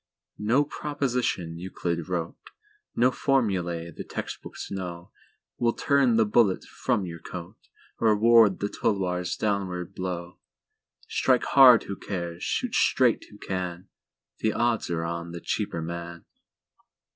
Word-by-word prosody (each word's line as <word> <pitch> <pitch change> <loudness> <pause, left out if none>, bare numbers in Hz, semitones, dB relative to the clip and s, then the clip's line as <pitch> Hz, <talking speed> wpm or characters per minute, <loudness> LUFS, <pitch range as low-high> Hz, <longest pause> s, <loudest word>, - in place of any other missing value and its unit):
No 120 +7 +3
proposition 125 - -2
Euclid 85 -2 -3
wroteNo 85 -2 -2 0.8
formulæ 90 - 0
the - - -6
text - - -6
books - - -8
know, 90 -3 -6 0.5
Will 120 -1 +2
turn 140 -5 +3
the 110 -1 +4
bullet 105 -2 +3
from 100 - -1
your 85 -1 -7
coat, 85 0 -8 0.4
Or 110 -2 +4
ward 115 -2 +5
the 100 - +1
tulwar's 95 -6 -1
downward 95 -4 -2
blow. 90 -1 -5 0.7
Strike 130 -2 +2
hard 130 -4 +7
who 100 - -5
cares—shoot 90 - -3
straight 125 - +3
who 105 - -14
can—The 95 +3 -5
odds 120 -1 0
are 85 -1 -1
on 85 0 -4
the 85 - -5
cheaper 80 0 -2
man. 85 0 -6
95 Hz, 120 wpm, -26 LUFS, 85-115 Hz, 0.8 s, hard